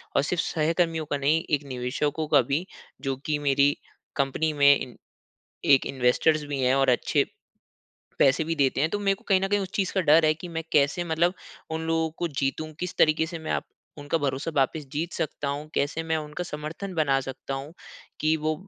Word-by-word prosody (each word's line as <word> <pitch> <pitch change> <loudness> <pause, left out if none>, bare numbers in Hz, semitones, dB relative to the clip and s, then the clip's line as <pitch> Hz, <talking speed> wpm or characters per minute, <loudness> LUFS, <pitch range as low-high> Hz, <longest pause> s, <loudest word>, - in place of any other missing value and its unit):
और - - +5
सिर्फ़ 170 +3 0
सहकर्मियों 165 0 0
का 145 - +1
नहीं, 150 +4 +2
एक 145 -1 +1
निवेशकों 135 +4 -2
का 145 -2 +5
भी, 140 +8 -1 0.4
जो 135 -1 -1
कि 150 -1 0
मेरी 140 0 +3 0.4
कंपनी 140 +3 0
में 140 -1 +6
इन 125 - -7 0.8
एक 135 - +6
इन्वेस्टर्स 135 +4 +2
भी 145 -1 -3
हैं 130 +1 +3
और 135 -1 +3
अच्छे 125 - +2 0.9
पैसे 135 +4 +4
भी 165 +1 -1
देते 140 -3 +2
हैं। 155 +3 +2
तो 205 - -1
मेरे 195 -1 +2
को - - -20
कहीं 190 -2 +4
न 195 - 0
कहीं 205 +1 +2
उस 190 -1 -4
चीज़ 195 -2 0
का 190 - +3
डर 160 0 +5
है 155 - +4
कि 170 +3 -9
मैं 165 -1 -4
कैसे 150 +4 +3
मतलब 170 +2 +1 0.4
उन 160 0 -3
लोगों 165 0 +1
को 175 - -1
जीतूँ? 145 +2 -2
किस 180 -1 -4
तरीके 155 +1 +4
से 170 0 -6
मैं 160 - -6
आप - - -1 0.3
उनका 145 +3 -1
भरोसा 140 +1 -2
वापिस 140 +2 0
जीत 165 +4 -3
सकता 150 -3 -3
हूँ? 145 +2 -4
कैसे 145 +3 0
मैं 160 0 0
उनका 150 +3 -5
समर्थन 165 +5 -6
बना 140 -4 +2
सकता 135 +1 -6
हूँ 135 +3 -6 0.5
कि 155 +1 +2
वो 155 0 -1
155 Hz, 205 wpm, -26 LUFS, 140-165 Hz, 0.9 s, में